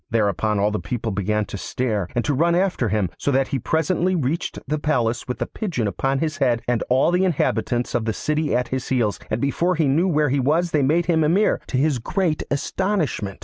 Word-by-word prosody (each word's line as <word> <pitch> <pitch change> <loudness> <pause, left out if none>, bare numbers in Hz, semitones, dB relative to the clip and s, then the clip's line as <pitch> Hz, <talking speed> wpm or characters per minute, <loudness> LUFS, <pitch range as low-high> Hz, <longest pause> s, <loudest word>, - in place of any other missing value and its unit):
Thereupon 105 -1 +1
all 100 +1 +2
the 105 - -2
people 115 -3 -3
began 105 +2 0
to 100 - -7
stare, 110 -7 -2
and 120 - 0
to 145 - +1
run 170 +5 +2
after 180 - +1
him, 100 -3 0
so - - -1
that 135 -1 +2
he 135 - -1
presently 170 +7 0
reached 155 +1 -2
the 155 0 -1
palace 120 -7 0
with 125 - -3
the - - -2
pigeon 175 - -3
upon 135 +8 -1
his 155 0 -2
head 125 -5 +1
and 120 -1 +1
all 130 +6 +3
the 180 +1 +2
inhabitants 130 -8 0
of 110 - 0
the 110 - 0
city 150 +3 -1
at 125 -1 0
his 130 0 -3
heels, 115 -6 0
and 110 - -1
before 170 +7 +1
he 160 -2 +1
knew 160 +7 +2
where 150 -4 +2
he 140 +2 +1
was 160 +6 +1
they 150 - +2
made 160 +6 +2
him 165 -2 +2
Emir, 180 +8 +2
to 130 - -2
his 140 -1 +1
great 170 - -1
astonishment. 145 - -1
135 Hz, 225 wpm, -22 LUFS, 115-160 Hz, -, all